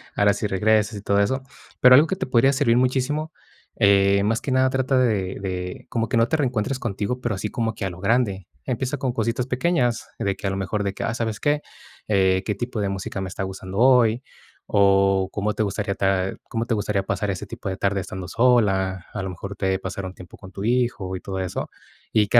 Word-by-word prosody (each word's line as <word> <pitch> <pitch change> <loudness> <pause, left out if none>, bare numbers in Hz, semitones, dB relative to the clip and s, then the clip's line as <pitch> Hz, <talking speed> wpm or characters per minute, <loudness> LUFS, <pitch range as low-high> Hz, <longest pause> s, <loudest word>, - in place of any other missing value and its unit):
ahora 100 0 +4
sí 105 - -2
regresas, 105 +2 +2
y - - -7
todo 100 0 +1
eso". 130 +7 +1 0.4
Pero 125 0 +8
algo 150 +5 +6
que 190 - -1
te - - -3
podría 130 +1 +4
servir 130 -4 +3
muchísimo, 135 +5 0 0.4
eh, 100 -1 +4
más 110 +3 +1
que 140 - -3
nada 130 0 +3
trata 130 0 +1
de 105 -7 +1
de 90 -2 -5
como 115 -1 -1
que 125 - +1
no 115 0 +4
te 160 - +1
reencuentres 130 -2 -1
contigo, 115 +2 -3
pero 120 -4 -1
así 105 +2 -3
como 115 -1 -2
que - - -4
a - - -1
lo 85 - -11
grande. 100 -3 0 0.2
Empieza 130 +3 -2
con 130 -1 -1
cositas 115 +1 -1
pequeñas, 130 -2 0
de 100 -1 0
que 100 - -4
a - - +1
lo 95 - -2
mejor 100 +2 -2
de 100 -1 -2
que: - - -4
"Ah, - - -1
¿sabes 110 -3 -3
qué? 145 0 +1 0.5
Eh, 95 -2 +3
¿qué 105 - -1
tipo 120 +2 -4
de 100 - 0
música 95 0 -4
me 95 - -3
está 95 - -4
gustando 95 0 -6
hoy?", 125 -1 +4 0.4
o 95 -1 +3
¿cómo 105 +1 -1
te 110 - 0
gustaría 100 0 -2
ta 95 -1 0 0.2
cómo 115 0 -2
te 120 - -1
gustaría 105 -2 0
pasar 100 +1 -2
ese 95 -3 -3
tipo - - -8
de 95 - -2
tarde 100 0 0
estando 95 -1 -6
sola? 95 -6 +2
A 105 - -3
lo 95 - -4
mejor 100 +3 -7
te 95 -1 0
eh, 95 - -1
pasar 95 0 -5
un 95 - -6
tiempo 90 -2 -13
con 95 -1 -13
tu 100 - -6
hijo 115 -5 0
y - - -8
todo 95 -1 -5
eso. 95 -2 -3 0.4
Y 105 -2 +4
que 120 - +7
105 Hz, 235 wpm, -23 LUFS, 95-120 Hz, 0.5 s, Pero